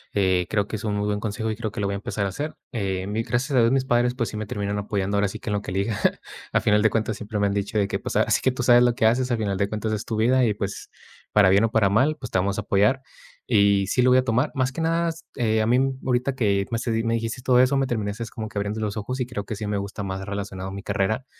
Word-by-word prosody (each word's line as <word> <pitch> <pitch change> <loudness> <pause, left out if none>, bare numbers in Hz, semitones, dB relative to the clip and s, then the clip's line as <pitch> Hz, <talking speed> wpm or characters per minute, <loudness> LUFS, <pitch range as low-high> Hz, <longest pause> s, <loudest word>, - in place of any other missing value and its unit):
eh, 95 -3 +2
creo 105 -2 0
que 110 - -4
es 105 - -9
un 105 - -1
muy 105 0 -1
buen 105 0 -1
consejo, 110 +1 -3
y - - -3
creo 110 -1 -4
que - - -7
lo 100 - 0
voy 100 - -2
a 100 - -2
empezar 100 0 -3
a - - -1
hacer. 145 +11 -5 0.2
Eh, 95 -5 -2
mi 105 +3 -1
gracias 135 +5 -1
a - - +6
Dios 115 +1 +4
mis 135 -1 +1
padres, 120 0 +2
pues, 120 -3 -1
sí 105 - -6
me 110 -1 -4
terminan 100 0 -2
apoyando 100 -1 -1
ahora 100 0 +2
sí 95 - -6
que - - -6
en - - 0
lo 100 - -1
que - - -8
elija. 100 +2 -1 0.5
Al - - +3
final 105 0 +3
de 110 - +4
cuentas 110 0 -1
siempre 105 0 -5
me 100 - +2
han 100 - -1
dicho 100 +1 -2
de 100 -1 +2
que: - - -2
"Pues, - - -5
ahora - - +2
sí - - +3
que 130 - +2
tú 125 0 -4
sabes 120 0 +6
lo 120 -1 +3
que 110 - +1
haces, 125 +3 +3
al 120 - +2
final 100 -3 -1
de 100 +1 0
cuentas 110 +1 -3
es 105 - -3
tu 110 - -3
vida, 125 +4 +3
y 110 - +2
pues, 100 -1 -5 0.4
para 100 -3 +6
bien 100 +4 +5
o 110 - -2
para 110 -3 +3
mal, 130 +10 +3
pues, 125 - -7
te 95 - +2
vamos 100 +2 -1
a 105 - 0
apoyar". 105 +7 +2 0.4
Y 100 -4 +3
sí 125 - +1
lo 125 0 +4
voy 130 - +6
a 130 - +1
tomar 125 +4 +1
más 130 0 +1
que 135 - -7
nada, 165 +1 +1 0.2
eh, 110 -3 +1
a 110 - +1
mí 120 +2 +4 0.3
ahorita 125 +1 +1
que 100 -6 +1
me 115 - 0
s 115 +1 -2
me 115 0 +1
dijiste 115 +3 -3
todo 125 -1 +4
eso 130 +2 +4
me 135 -1 +1
terminaste 110 -1 -3
como 110 -2 -5
que 105 - -9
abriendo 100 +2 -2
los 105 -1 -2
ojos, 120 +5 -4
y 125 - 0
creo 120 -4 -5
que 110 - -4
sí 105 0 -4
me 105 - -1
gusta 100 +1 -5
más 95 0 -4
relacionado 95 -2 -5
mi 100 - -6
carrera, 105 +5 -1
110 Hz, 310 wpm, -24 LUFS, 100-120 Hz, 0.5 s, a